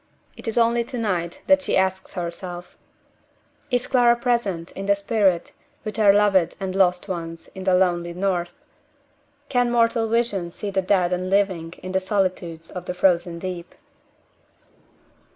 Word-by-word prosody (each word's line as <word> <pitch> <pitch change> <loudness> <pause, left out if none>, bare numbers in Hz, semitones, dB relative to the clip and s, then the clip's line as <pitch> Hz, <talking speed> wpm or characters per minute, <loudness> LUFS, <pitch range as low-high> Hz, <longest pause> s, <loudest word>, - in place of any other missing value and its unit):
It - - -11
is 225 - -2
only 235 0 +3
to 250 - -6
night 180 -7 -2
that 285 0 +5
she - - +1
asks 190 0 0
herself: 175 0 -6 0.9
"Is 245 -1 0
Clara 240 -2 +4
present, 235 -9 -1
in 195 +1 -6
the 200 - +4
spirit, 200 -4 +1 0.3
with 215 -1 -5
our 205 -2 +7
loved 200 -4 +3
and 190 -1 -4
lost 180 -2 +2
ones 165 -2 -6
in 190 -1 -8
the 185 -1 +4
lonely 175 -2 +1
North? 180 -2 -2 0.8
Can 245 -3 +1
mortal 230 -1 +2
vision 220 -6 0
see 200 +4 -5
the 190 0 +1
dead 185 -2 +2
and 185 +1 -2
living 185 -4 +1
in 185 - -5
the 190 - +2
solitudes 185 -4 -2
of 180 - -7
the 180 - -4
Frozen 175 -2 +2
Deep?" 180 0 -6
190 Hz, 155 wpm, -23 LUFS, 175-215 Hz, 0.9 s, our